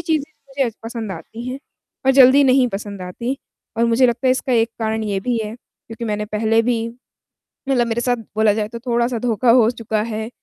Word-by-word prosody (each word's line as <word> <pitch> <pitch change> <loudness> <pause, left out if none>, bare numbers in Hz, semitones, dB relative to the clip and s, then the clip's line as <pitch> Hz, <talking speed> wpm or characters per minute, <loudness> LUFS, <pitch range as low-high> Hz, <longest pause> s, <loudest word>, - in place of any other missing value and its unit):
चीज़ें 315 -3 -1 0.2
मुझे 270 -3 -1
पसंद 225 -3 -5
आती 235 +5 -8
हैं, 260 - -4 0.5
और - - +7
जल्दी 270 +1 +7
नहीं 260 -1 +4
पसंद 200 -2 -6
आती, 235 +9 -4 0.4
और 230 - +2
मुझे 235 +2 +4
लगता 240 +2 -1
है, - - +5
इसका 260 0 0
एक 230 -1 +2
कारण 220 0 -1
ये 200 -2 -1
भी 245 +3 -1
है, 210 +1 -6
क्योंकि 230 -1 -11
मैंने 210 -1 -2
पहले 220 +2 +1
भी 230 -1 0 0.8
मतलब 250 -3 +2
मेरे 230 0 -1
साथ 245 0 +1 0.2
बोला 215 -1 +4
जाए, 210 0 -2
तो 235 +1 -7
थोड़ा-सा 240 0 +1
धोखा 235 +1 +1
हो 230 -1 +5
चुका 220 -3 -2
है, 220 0 -4
230 Hz, 200 wpm, -20 LUFS, 220-250 Hz, 0.8 s, और